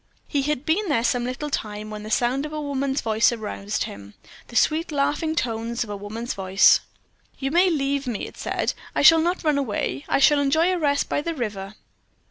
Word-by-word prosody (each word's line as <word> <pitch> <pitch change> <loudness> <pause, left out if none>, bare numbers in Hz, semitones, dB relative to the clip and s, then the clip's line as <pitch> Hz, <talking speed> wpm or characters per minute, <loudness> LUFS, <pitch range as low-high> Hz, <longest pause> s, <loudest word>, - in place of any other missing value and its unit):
He 285 - 0
had 295 0 -2
been 370 +5 +1
there 230 -6 +1
some 245 0 +1
little 275 +4 -4
time 210 -3 -4
when 210 0 -6
the 215 - -8
sound 250 +6 +1
of - - -12
a 305 - -3
woman's 275 -1 -1
voice 220 +1 +3
aroused 215 -2 -3
him 100 0 -9 0.3
the 240 - -13
sweet 315 +6 +2
laughing 300 +3 0
tones 230 -3 -2
of 210 - -8
a - - -3
woman's 215 +4 -5
voice. 190 0 +4 0.6
"You 270 0 -3
may 360 +3 +4
leave 280 -3 -1
me," 230 -5 -3
it - - -11
said. - - -2 0.2
"I - - +1
shall 325 -1 +8
not 350 +3 -1
run 300 -3 +2
away. 205 - -2
I - - +3
shall 290 +1 +5
enjoy 315 +6 +2
a 360 - -1
rest 285 -2 +1
by - - -1
the 335 +2 -3
river." 210 -5 -5
270 Hz, 210 wpm, -23 LUFS, 215-300 Hz, 0.6 s, shall